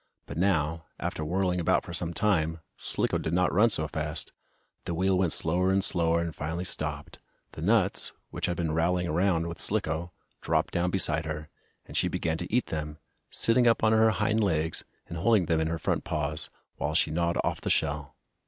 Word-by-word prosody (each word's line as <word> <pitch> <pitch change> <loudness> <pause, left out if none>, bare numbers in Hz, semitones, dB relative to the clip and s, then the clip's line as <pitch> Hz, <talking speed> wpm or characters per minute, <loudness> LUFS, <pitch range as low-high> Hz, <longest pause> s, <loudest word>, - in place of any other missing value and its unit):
But 70 - -8
now, 80 -3 +1
after 80 - -3
whirling 90 +2 0
about 85 - +2
for 85 - -7
some 85 0 0
time, 85 -5 +1 0.2
Slicko - - -1
did 80 - -3
not 90 +1 +2
run 105 +5 +5
so 80 -7 0
fast. - - -4 0.5
The 85 - -2
wheel 95 +2 +2
went 90 -2 +2
slower 90 +4 +2
and 95 0 +2
slower, 85 -2 +2
and 85 -1 -3
finally 80 +4 -3
stopped. 75 -4 -3 0.3
The - - -9
nuts, - - +3 0.2
which - - -2
had 90 -1 -2
been 80 -2 -1
rattling 85 +2 +1
around 85 +1 +1
with 85 0 -6
Slicko, 80 +3 +1 0.3
dropped - - 0
down 85 +1 +1
beside 85 -4 0
her, 75 -1 -5 0.4
and - - -11
she - - +2
began 80 -1 -1
to 90 - -6
eat 125 +3 +2
them, 75 -1 -4 0.3
sitting 120 +1 +3
up 115 - +3
on 110 - +5
her 110 0 +5
hind 105 +1 +1
legs, 80 -4 0 0.2
and 85 - -6
holding 110 -1 +3
them 80 0 +1
in 80 - 0
her 85 +1 -1
front - - -1
paws, 75 0 -2 0.3
while 75 +1 -2
she 80 - +2
gnawed 85 +1 0
off - - -2
the - - -3
shell. 75 -2 0
85 Hz, 200 wpm, -28 LUFS, 80-95 Hz, 0.5 s, run